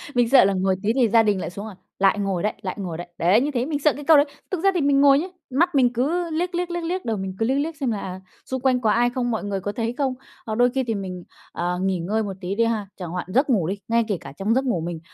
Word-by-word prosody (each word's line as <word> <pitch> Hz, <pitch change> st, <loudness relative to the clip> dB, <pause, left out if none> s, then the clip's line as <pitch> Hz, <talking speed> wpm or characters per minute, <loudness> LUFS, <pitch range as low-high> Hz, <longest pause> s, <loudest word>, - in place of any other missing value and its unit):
Mình 240 Hz, -1 st, +3 dB
sợ 270 Hz, -7 st, +7 dB
là 200 Hz, -, +2 dB
ngồi 190 Hz, 0 st, +1 dB
tí 220 Hz, +2 st, +2 dB
thì 245 Hz, -4 st, +3 dB
gia 225 Hz, +1 st, +5 dB
đình 205 Hz, -3 st, +1 dB
lại -, -, -4 dB
xuống, 200 Hz, +4 st, -7 dB
à, 210 Hz, -, -9 dB, 0.2 s
"Lại 195 Hz, +2 st, +3 dB
ngồi 195 Hz, -3 st, -1 dB
đấy, 210 Hz, -, 0 dB
lại 185 Hz, -, -4 dB
ngồi 175 Hz, -4 st, -4 dB
đấy." 175 Hz, -, -7 dB
Đấy, 185 Hz, +8 st, +4 dB
như 295 Hz, +2 st, -1 dB
thế, 245 Hz, -1 st, -1 dB
mình 295 Hz, -1 st, -2 dB
sợ 300 Hz, 0 st, +3 dB
cái 290 Hz, -, -8 dB
câu 315 Hz, 0 st, +6 dB
đấy. 285 Hz, -, +5 dB, 0.3 s
Thực 370 Hz, -2 st, -2 dB
ra 390 Hz, -, +6 dB
thì 350 Hz, -, 0 dB
mình 280 Hz, 0 st, +3 dB
ngồi 280 Hz, 0 st, +6 dB
nhớ, 355 Hz, -, -3 dB, 0.2 s
mắt 325 Hz, +6 st, +1 dB
mình 245 Hz, -3 st, +4 dB
cứ 330 Hz, +8 st, 0 dB
liếc, 345 Hz, +3 st, -1 dB
liếc, 355 Hz, 0 st, -1 dB
liếc, 345 Hz, -1 st, -3 dB
liếc, 360 Hz, 0 st, -3 dB
đầu 225 Hz, -2 st, -1 dB
mình 190 Hz, -1 st, -5 dB
cứ 225 Hz, -, +2 dB
liếc 265 Hz, +3 st, +1 dB
liếc 320 Hz, +2 st, -2 dB
xem 265 Hz, -6 st, -1 dB
là, 205 Hz, -, -2 dB
à, 185 Hz, 0 st, -6 dB, 0.2 s
xung 260 Hz, -1 st, -4 dB
quanh 255 Hz, -2 st, +2 dB
có 220 Hz, -, +2 dB
ai 240 Hz, +1 st, +3 dB
không, 245 Hz, -1 st, -2 dB
mọi 220 Hz, -, -2 dB
người 200 Hz, -1 st, -2 dB
có 205 Hz, +2 st, -3 dB
thấy 230 Hz, +2 st, -2 dB
không. 270 Hz, -3 st, 0 dB, 0.3 s
Hoặc 220 Hz, -1 st, -3 dB
đôi 245 Hz, 0 st, +5 dB
khi 265 Hz, +1 st, -1 dB
thì 225 Hz, -3 st, -2 dB
mình, 185 Hz, -3 st, -5 dB, 0.3 s
ờ, 180 Hz, +1 st, -2 dB
nghỉ 190 Hz, -2 st, 0 dB
ngơi 215 Hz, +6 st, -1 dB
một 195 Hz, -2 st, -4 dB
tí 190 Hz, +2 st, -3 dB
đi 230 Hz, -, +2 dB
ha, 220 Hz, -3 st, -1 dB
chẳng 180 Hz, -3 st, -6 dB
hoạn 180 Hz, 0 st, -4 dB
giấc 270 Hz, +3 st, +3 dB
ngủ 190 Hz, -10 st, +2 dB
đi, 200 Hz, +2 st, -2 dB
ngay 230 Hz, 0 st, +2 dB
kể 200 Hz, -5 st, -1 dB
cả 135 Hz, -, -9 dB
trong 210 Hz, +4 st, +1 dB
giấc 265 Hz, +1 st, +1 dB
ngủ 180 Hz, -10 st, 0 dB
mình. 170 Hz, -1 st, -4 dB
230 Hz, 315 wpm, -23 LUFS, 195-275 Hz, 0.3 s, sợ